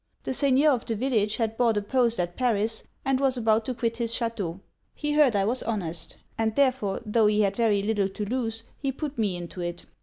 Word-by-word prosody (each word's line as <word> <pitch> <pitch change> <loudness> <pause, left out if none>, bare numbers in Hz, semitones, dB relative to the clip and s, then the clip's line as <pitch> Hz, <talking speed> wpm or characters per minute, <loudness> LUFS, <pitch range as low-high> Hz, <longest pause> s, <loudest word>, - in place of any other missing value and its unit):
The - - -2
seigneur 280 +2 +4
of 245 -4 -1
the 225 - 0
village 215 -3 +1
had 225 -1 -1
bought 230 -3 +3
a - - +1
post 235 0 +1
at 175 0 -2
Paris, 225 -3 0 0.2
and 270 -1 +2
was 270 -2 +2
about 220 -1 +2
to 255 - -3
quit 230 -1 -1
his 235 -2 -1
chateau. 205 -7 -2 0.4
He 295 0 -2
heard 295 -6 +4
I 195 -1 +2
was 245 +5 0
honest; 170 -7 -3 0.2
and 220 -1 +1
therefore, 255 -8 +1
tho' 215 0 +3
he 210 0 +3
had 200 -1 +1
very 210 -3 +2
little 205 -2 +1
to 210 +2 -4
lose, 225 -1 -2 0.2
he 275 -1 -1
put 285 -1 -5
me 205 -5 +1
into 175 +1 -7
it. 175 0 -5
225 Hz, 220 wpm, -26 LUFS, 205-255 Hz, 0.4 s, seigneur